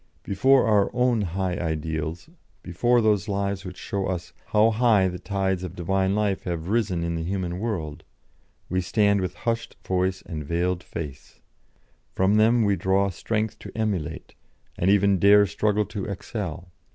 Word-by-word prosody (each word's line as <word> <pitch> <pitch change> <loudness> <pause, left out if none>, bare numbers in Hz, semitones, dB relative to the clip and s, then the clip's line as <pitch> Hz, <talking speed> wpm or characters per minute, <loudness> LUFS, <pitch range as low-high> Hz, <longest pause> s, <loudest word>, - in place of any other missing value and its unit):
Before 130 +7 +3
our 105 -3 +3
own 125 -2 +2
high 95 -1 -2
ideals, 80 - -3 0.4
before 120 +8 +2
those 105 -1 +2
lives 100 -1 -2
which 90 -2 -8
show 100 -1 -3
us 90 -2 -4
'how 110 +2 +4
high 110 -4 +3
the 90 -1 -5
tides 95 -2 -1
of 90 -1 -6
Divine 95 +2 0
life 105 -2 0
have 85 -1 -3
risen 105 -6 0
in 85 0 -2
the 85 - -2
human 90 0 -3
world,' 85 -10 -4 0.6
we 95 +1 0
stand 100 +1 +2
with 90 - -3
hushed 115 0 -1
voice 95 0 0
and 75 -3 -6
veiled 85 +4 -1
face; 75 -7 -8 0.7
from 95 +3 +2
them 115 +2 +4
we 100 -1 +2
draw 95 +1 +1
strength 110 +4 -2
to - - -9
emulate, 100 -9 -3 0.4
and 90 - +1
even 100 -1 +4
dare 100 +1 +6
struggle 105 +1 0
to 100 -1 -5
excel. 95 -3 -5
95 Hz, 160 wpm, -25 LUFS, 90-105 Hz, 0.7 s, dare